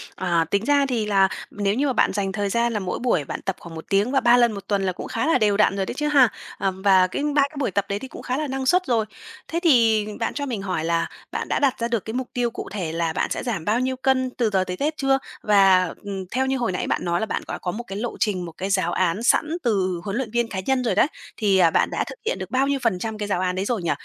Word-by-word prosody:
ờ, 170 -3 +1
tính 200 +3 +1
ra 285 -1 +3
thì 235 -5 -1
là 195 -2 +4 0.2
nếu 205 -1 0
như 285 +3 +1
mà 260 - +1
bạn - - +2
dành 195 -1 -1
thời 200 0 -2
gian 235 +2 +1
là 210 - 0
mỗi 185 -2 -3
buổi 235 - +1
bạn - - -5
tập 195 - -2
khoảng 165 -1 -10
1 160 - -8
tiếng 205 +5 +2
và 270 - +3
3 240 0 +5
lần 240 -2 +4
1 200 -2 -8
tuần 200 -2 +1
là 185 - +1
cũng - - -7
khá 230 +7 -2
là 325 - +4
đều 210 -3 +2
đặn 210 -2 +3
rồi 195 -1 -1
đấy - - -4
chứ 300 +3 -2
ha, 270 -6 +5 0.3
ừm, 190 -1 -2
và 190 -2 +5
cái 280 - -3
3 285 - +5
cái 310 - -17
buổi 250 -8 0
tập 200 +1 0
đấy 200 +1 -1
thì 265 - -7
cũng - - -10
khá 255 +1 -2
là 305 -1 -2
năng 265 0 -3
suất 365 +5 +3
rồi. 225 -3 +2 0.4
Thế 335 - -2
thì 230 -8 +4
bạn 230 - -1
cho 285 -1 -3
mình 235 -7 -3
hỏi 180 -5 -2
là 170 0 +1 0.2
bạn - - -3
đã - - 0
đặt 270 -4 +1
ra 235 - 0
được 230 -4 -2
cái 220 - -5
mục 255 0 -3
tiêu 240 -1 0
cụ - - -7
thể 180 -6 -3
là 165 -1 -1
bạn - - -1
sẽ - - -2
giảm 220 -10 -3
bao 220 +3 +2
nhiêu 260 0 -1
cân 260 0 +1
từ 235 -3 +2
giờ 190 -2 +2
tới 180 0 -5
Tết 305 +2 -1
chưa? 270 -1 +2 0.3
Và, 195 -3 +5 0.2
ừm, 195 -2 -4
theo 260 +2 +1
như 265 0 0
hồi 235 -6 -1
nãy 180 - -3
bạn - - -1
nói 175 0 +1
là 220 - -1
bạn - - -3
có - - -4
có 180 - -2
một 235 +5 -6
cái 195 - -5
lộ 235 +2 -4
trình, 195 -6 0
một 165 - -7
cái 190 +2 -3
giáo 185 -3 +1
án 185 +5 0
sẵn 310 +6 +2
từ 185 -6 0
huấn 200 +1 -4
luyện 245 -5 -3
viên 240 -1 +1
cá 190 - -4
nhân 265 -1 +1
rồi 240 - 0
đấy, - - +4 0.3
thì 195 -3 +3
bạn - - +3
đã - - 0
thực - - -9
hiện 480 - 0
được - - -6
bao 265 +2 +2
nhiêu 280 -1 0
phần 210 -6 +1
trăm 220 +2 -4
cái 210 -1 -3
giáo 195 -3 0
án 180 -1 0
đấy 190 +2 -2
rồi 230 -5 -1
nhỉ? 170 - 0
215 Hz, 310 wpm, -23 LUFS, 190-255 Hz, 0.4 s, 3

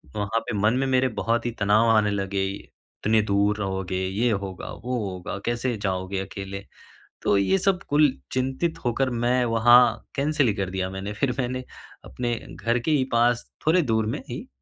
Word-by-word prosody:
वहाँ 105 +2 0
पे - - -2
मन 105 +3 +3
में 135 +1 +1
मेरे 130 0 +3
बहुत 115 +1 0
ही 120 - 0
तनाव 105 +3 +4
आने 110 -2 +4
लगे, 100 -1 -1
इतने 110 +2 -2
दूर 100 0 +1
रहोगे, 95 -2 -2
ये 110 +6 +1
होगा, 100 -3 -4
वो 125 +1 -4
होगा, 90 +1 -6
कैसे 120 +1 -1
जाओगे 95 0 -2
अकेले? 100 +1 -7 0.6
तो 100 - +3
ये 100 - +2
सब 190 -1 +1
कुल 145 -1 +4 0.2
चिंतित 135 +6 -1
होकर 125 +2 +1
मैं 120 +1 +1
वहाँ 120 +2 +7 0.3
कैंसल 145 0 +1
ही 105 - +1
कर 95 -3 -3
दिया 95 0 -2
मैंने। 95 +2 -5
फिर 125 +4 -1
मैंने 130 0 -2 0.4
अपने 120 -1 -2 0.2
घर 115 +1 0
के 125 - -2
ही 145 -4 +3
पास 120 0 +2 0.2
थोड़े 170 +3 +4
दूर 110 -5 +1
में 110 - -2
ही, - - -6
115 Hz, 180 wpm, -25 LUFS, 100-125 Hz, 0.6 s, वहाँ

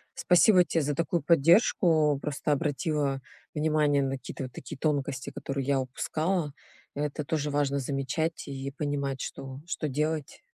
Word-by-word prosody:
Спасибо 180 0 +5
те 165 - 0
за 145 -1 -1
такую 165 0 0
поддержку. 160 -2 +4
Просто 150 0 -2
обратила 145 -2 0 0.3
внимание 150 -2 +2
на 135 - -1
какие-то 130 - -7
вот 130 - -6
такие 155 - -8
тонкости, 140 -3 -1
которые 135 -1 -4
я 140 -1 +3
упускала. 155 +5 -1 0.4
А 145 - -2
это 150 0 -2
тоже 150 0 -1
важно 140 -1 +1
замечать 140 +5 -2
и 135 0 -5
понимать, 140 -2 -2
что 135 0 -6
что 155 -2 -2
делать. 150 +2 -2
145 Hz, 150 wpm, -28 LUFS, 135-155 Hz, 0.4 s, Спасибо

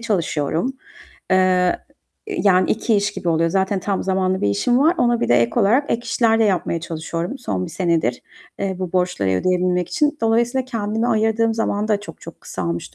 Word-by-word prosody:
çalışıyorum, 170 - -1 0.6
eee, 185 -1 +3 0.5
yani 200 - +2
2 225 +1 +1
iş 200 0 0
gibi 190 -3 -4
oluyor. 165 0 +2
Zaten 190 +1 0
tam 195 +1 -2
zamanlı 190 0 0
bir - - +1
işim 100 - +1
var. 315 +5 +4
Ona 240 -3 +2
birde 120 - +2
ek 235 - 0
olarak 245 +8 +2
ek 230 - +1
işler 230 -1 +2
de 225 - +4
yapmaya 180 -4 0
çalışıyorum, 165 - -4
son 95 - -3
1 - - -9
senedir, 165 -9 0 0.4
eee, 195 -1 -2
bu 185 -2 -4
borçları 180 - 0
ödeyebilmek 180 - +1
için. 300 -3 0
Dolayısıyla 235 +3 +1
kendime 225 -2 -2
ayırdığım 225 0 +1
zaman 215 -1 -1
da 210 -2 +1
çok 205 - -11
çok - - -11
kısalmış 85 -2 -5
195 Hz, 175 wpm, -20 LUFS, 175-225 Hz, 0.6 s, var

